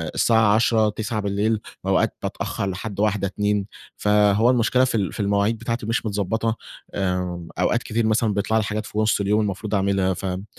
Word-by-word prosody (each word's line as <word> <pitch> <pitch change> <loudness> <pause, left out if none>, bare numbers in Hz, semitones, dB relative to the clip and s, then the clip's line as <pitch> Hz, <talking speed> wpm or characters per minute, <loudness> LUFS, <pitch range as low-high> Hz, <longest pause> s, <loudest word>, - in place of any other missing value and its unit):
الساعة 110 -3 +4
22:00 110 -1 +3
21:00 110 +1 -3
بالليل، 105 +2 0 0.2
وأوقات - - +1
بتأخر 100 - -3
لحد 100 +2 -6
01:00 105 -2 +1
02:00، 105 +1 -1 0.3
فهو 105 +2 +3
المشكلة 125 +1 +3
في 125 - -2
ال 100 -4 -1
في - - -9
المواعيد 100 +2 +1
بتاعتي 115 0 -3
مش 115 +1 -1
متضبطة. 110 +2 -1 0.4
آآ، 90 -3 -2
أوقات 120 - +1
كتيرة 115 0 0
مثلًا 110 -1 +2
بيطلع 100 +2 0
لي 110 - +2
حاجات 105 +1 -3
في 105 - -8
نص 110 -1 +2
اليوم 105 +2 +2
المفروض 105 +1 -2
أعملها، 95 -1 +1
فاهم؟ 95 +1 -4
105 Hz, 175 wpm, -23 LUFS, 100-110 Hz, 0.4 s, الساعة